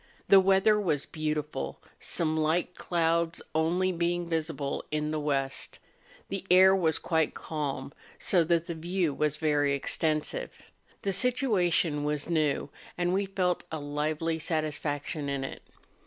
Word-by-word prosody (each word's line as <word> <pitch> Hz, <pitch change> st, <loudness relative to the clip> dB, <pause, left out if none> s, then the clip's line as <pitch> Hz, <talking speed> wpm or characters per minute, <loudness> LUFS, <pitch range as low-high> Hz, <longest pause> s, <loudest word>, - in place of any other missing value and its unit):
The 195 Hz, -, +9 dB
weather 195 Hz, +3 st, +4 dB
was 150 Hz, -8 st, 0 dB
beautiful, 150 Hz, -, -3 dB, 0.2 s
some 155 Hz, -2 st, 0 dB
light 160 Hz, +3 st, +1 dB
clouds 165 Hz, -1 st, 0 dB
only 175 Hz, +4 st, +1 dB
being 175 Hz, 0 st, -1 dB
visible 155 Hz, -4 st, -2 dB
on 150 Hz, 0 st, -1 dB
the 155 Hz, -, -1 dB
west; 135 Hz, -2 st, -1 dB, 0.5 s
the 195 Hz, -1 st, -3 dB
air 190 Hz, +1 st, +7 dB
was 165 Hz, -5 st, +2 dB
quite 160 Hz, -3 st, 0 dB
calm, 140 Hz, -3 st, -4 dB, 0.2 s
so 175 Hz, -3 st, +3 dB
that 170 Hz, 0 st, +2 dB
tlie 170 Hz, -1 st, -6 dB
view 175 Hz, -2 st, 0 dB
was 150 Hz, +1 st, 0 dB
very 145 Hz, -2 st, +2 dB
extensive; 155 Hz, -, -1 dB, 0.3 s
the 195 Hz, -, 0 dB
situation 185 Hz, -, +2 dB
was 150 Hz, -1 st, -2 dB
new, 155 Hz, -4 st, 0 dB, 0.3 s
and 175 Hz, 0 st, +1 dB
we 195 Hz, +1 st, 0 dB
felt 185 Hz, -2 st, 0 dB
a 160 Hz, -, -3 dB
lively 155 Hz, +3 st, -2 dB
satisfaction 150 Hz, -2 st, -2 dB
in 140 Hz, -1 st, -2 dB
it. 135 Hz, -, -6 dB
160 Hz, 140 wpm, -29 LUFS, 150-180 Hz, 0.5 s, The